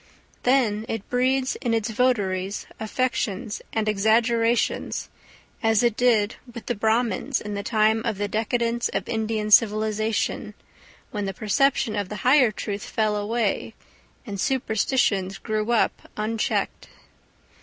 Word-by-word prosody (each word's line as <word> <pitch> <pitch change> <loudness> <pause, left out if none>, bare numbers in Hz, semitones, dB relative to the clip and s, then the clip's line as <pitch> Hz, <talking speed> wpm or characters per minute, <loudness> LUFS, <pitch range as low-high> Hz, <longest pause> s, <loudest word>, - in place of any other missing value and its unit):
Then 240 -5 +2
it 225 -3 -4
breeds 260 +1 +1
in 235 -2 0
its 225 0 -1
votaries 200 -5 0
affections 220 -2 -2
and 220 -1 -1
exaggerations, 230 +3 +1 0.5
as 225 0 +3
it 235 -3 +2
did 225 -4 +2
with 235 -1 -9
the 245 - -1
Brahmins 225 +3 0
in 210 0 -6
the 200 - -2
time 220 +1 +2
of 230 -4 -2
the 205 +1 -1
decadence 235 +2 0
of - - -3
Indian 220 -1 -2
civilisation, 215 -1 +2 0.6
when 205 -4 -3
the 195 -1 -4
perception 230 +2 +1
of 200 -2 -2
the 210 - -5
higher 255 -2 +6
truth 205 -1 -5
fell 215 -1 0
away 210 0 -1 0.5
and 200 -5 -5
superstitions 220 -6 0
grew 215 0 -2
up 235 - 0
unchecked. 215 +1 -1
220 Hz, 130 wpm, -24 LUFS, 210-240 Hz, 0.6 s, higher